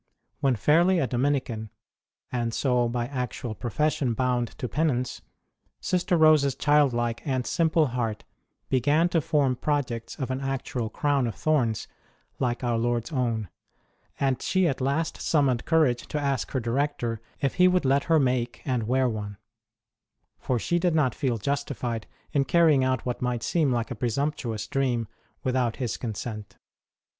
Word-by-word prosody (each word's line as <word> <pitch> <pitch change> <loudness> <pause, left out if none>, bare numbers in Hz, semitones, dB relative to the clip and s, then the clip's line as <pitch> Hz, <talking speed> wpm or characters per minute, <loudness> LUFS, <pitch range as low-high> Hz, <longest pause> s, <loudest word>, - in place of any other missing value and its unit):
When 135 -2 +2
fairly 170 - +4
a 145 - +2
Dominican, 125 -4 -1 0.6
and 120 -2 -1
so 125 -3 +2
by 120 0 -1
actual 125 -3 -4
profession 125 +2 -1
bound 125 -1 +1
to 125 - -3
penance, 130 -4 -1 0.6
Sister 180 -1 +1
Rose 155 -2 +6
s 140 -2 0
child 145 -1 +4
like 120 -1 -1
and 130 -4 -1
simple 160 -1 +2
heart 115 -4 -2 0.4
began 145 +7 +2
to 165 -2 +2
form 140 -4 +1
projects 125 -5 -2
of 130 -4 -4
an 130 +1 -2
actual 135 -3 -3
crown 140 +1 +1
of 115 - -4
thorn 150 -7 +2
s 110 - -5 0.5
like 125 -1 -1
our 120 -2 +1
Lord 120 0 0
s 155 - -9
own; 115 - -1 0.7
and 135 -3 +1
she 185 -2 +2
at 135 -4 -2
last 140 +5 -1
summoned 135 -6 +1
courage 155 -7 +2
to 150 - -2
ask 140 -2 -1
her 130 - -1
director 120 -2 -1 0.2
if 135 - 0
he 180 - +8
would 180 -4 +2
let 140 +1 +2
her 165 -1 +4
make 125 -3 0
and 125 -5 -1
wear 130 +1 +2
one; 105 -3 -4 1.0
for 125 - -1
she 175 +9 0
did 175 -2 +1
not 135 -6 +2
feel 130 -6 -1
justified 125 -2 -3 0.2
in 140 -1 +2
carrying 160 -5 +4
out 130 -2 0
what 125 -1 -3
might 125 -2 -1
seem 155 -6 +1
like 120 +1 -1
a - - -3
presumptuous 120 -2 -2
dream 125 -5 0 0.4
without 125 -3 0
his 125 -6 -2
consent. 110 -2 -6
130 Hz, 165 wpm, -26 LUFS, 120-145 Hz, 1.0 s, he